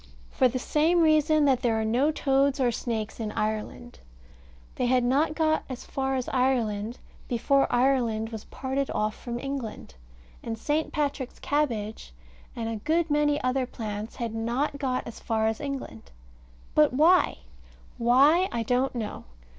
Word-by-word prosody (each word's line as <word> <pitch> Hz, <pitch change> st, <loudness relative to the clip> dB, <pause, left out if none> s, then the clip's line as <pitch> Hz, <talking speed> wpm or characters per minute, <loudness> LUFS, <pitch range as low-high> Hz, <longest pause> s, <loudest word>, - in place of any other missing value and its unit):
For 260 Hz, -, +3 dB
the 250 Hz, +1 st, -2 dB
same 315 Hz, +7 st, +2 dB
reason 310 Hz, -1 st, +4 dB
that 265 Hz, -3 st, +3 dB
there 225 Hz, -2 st, +1 dB
are 220 Hz, -, -1 dB
no 245 Hz, +7 st, +2 dB
toads 275 Hz, -2 st, +1 dB
or 250 Hz, -2 st, +3 dB
snakes 225 Hz, -2 st, -4 dB
in 215 Hz, -2 st, -3 dB
Ireland. 215 Hz, +3 st, -4 dB, 0.7 s
They 250 Hz, -, -1 dB
had 250 Hz, 0 st, +3 dB
not 285 Hz, +6 st, +2 dB
got 315 Hz, -1 st, +1 dB
as 255 Hz, -2 st, -7 dB
far 270 Hz, 0 st, -2 dB
as 255 Hz, -2 st, -2 dB
Ireland 235 Hz, -4 st, 0 dB, 0.3 s
before 275 Hz, +3 st, +2 dB
Ireland 240 Hz, -4 st, +1 dB
was 220 Hz, -2 st, -7 dB
parted 270 Hz, +1 st, -3 dB
off 215 Hz, 0 st, 0 dB
from 240 Hz, -1 st, -6 dB
England. 260 Hz, -, -5 dB, 0.5 s
And 225 Hz, -1 st, -4 dB
St. 300 Hz, +6 st, -1 dB
Patrick's 285 Hz, -4 st, -2 dB
cabbage, 225 Hz, -, -2 dB, 0.4 s
and 230 Hz, -1 st, -3 dB
a 225 Hz, -1 st, -3 dB
good 320 Hz, +7 st, 0 dB
many 295 Hz, 0 st, +2 dB
other 255 Hz, 0 st, 0 dB
plants, 215 Hz, -2 st, -6 dB
had 235 Hz, -3 st, -4 dB
not 240 Hz, +6 st, -1 dB
got 255 Hz, -2 st, -1 dB
as 235 Hz, -, -9 dB
far 220 Hz, -1 st, 0 dB
as 220 Hz, +3 st, -1 dB
England. 275 Hz, -, -6 dB, 0.6 s
But 300 Hz, -3 st, +4 dB
why? 330 Hz, +7 st, +4 dB, 0.6 s
Why, 280 Hz, +10 st, +5 dB
I 235 Hz, -1 st, -1 dB
don't 250 Hz, +3 st, 0 dB
know. 220 Hz, -3 st, -5 dB
255 Hz, 155 wpm, -27 LUFS, 225-285 Hz, 0.7 s, Why